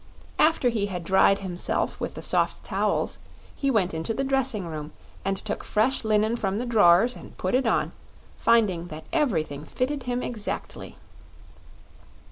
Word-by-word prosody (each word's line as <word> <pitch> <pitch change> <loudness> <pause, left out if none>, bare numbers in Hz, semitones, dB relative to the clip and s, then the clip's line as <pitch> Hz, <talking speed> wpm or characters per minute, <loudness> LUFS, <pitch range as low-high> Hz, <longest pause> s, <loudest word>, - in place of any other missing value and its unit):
After 310 -5 +4
he 215 -4 -1
had 180 -3 -5
dried 190 +2 +4
himself 180 -1 -1
with - - -4
the - - -7
soft - - 0
towels - - -1 0.4
he 275 - 0
went 200 -9 +2
into 160 +8 -2
the 270 - -1
dressing 265 -7 0
room 155 -2 -6 0.3
and 195 0 -1
took 210 +1 -4
fresh 245 +6 +1
linen 215 +1 +2
from 195 -3 -1
the 245 - -2
drawers 220 0 +5
and - - -12
put 185 - -2
it 255 -1 +2
on, - - +1 0.4
finding 205 -7 +2
that 155 -1 -8
everything 160 - 0
fitted 265 - -2
him 245 0 -1
exactly. 220 -4 -5
215 Hz, 155 wpm, -26 LUFS, 180-245 Hz, 0.4 s, drawers